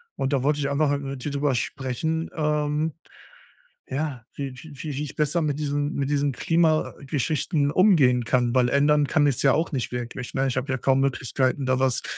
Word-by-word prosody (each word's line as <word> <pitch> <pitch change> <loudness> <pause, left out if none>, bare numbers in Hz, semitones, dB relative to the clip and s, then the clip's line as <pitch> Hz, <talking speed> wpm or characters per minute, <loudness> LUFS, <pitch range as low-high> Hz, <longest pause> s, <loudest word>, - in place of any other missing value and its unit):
und 135 +2 -1
da 135 -2 +1
wollte 145 +1 +1
ich 140 -1 -1
einfach 140 +1 +1
mal 145 - +1
mit 135 -2 -6
dir 145 - -3
drüber 140 -2 0
sprechen, 150 +7 -2
ähm, 150 0 0 1.0
ja, 135 -3 -3
wie 140 -2 -4
wie 155 +3 -12
wie 150 - -4
wie 145 - -2
ich 150 - -7
besser 150 +3 +1
mit 150 -3 -1
diesen 145 -1 -2
mit 140 0 -1
diesen 145 -1 +1
Klimageschichten 155 - 0
umgehen 145 - +4
kann, 120 0 +1
weil 125 -1 +3
ändern 145 +1 +3
kann 145 +2 +2
ich's 140 -4 +1
ja 135 - +4
auch 160 +3 0
nicht 130 -5 -2
wirklich, 125 +1 -5
ne? 135 0 +1
Ich 130 -1 -1
habe 130 +2 -2
ja 130 - 0
kaum 135 +1 +2
Möglichkeiten, 130 0 0
da 130 0 +1
was 130 -2 +1
140 Hz, 200 wpm, -24 LUFS, 130-150 Hz, 1.0 s, umgehen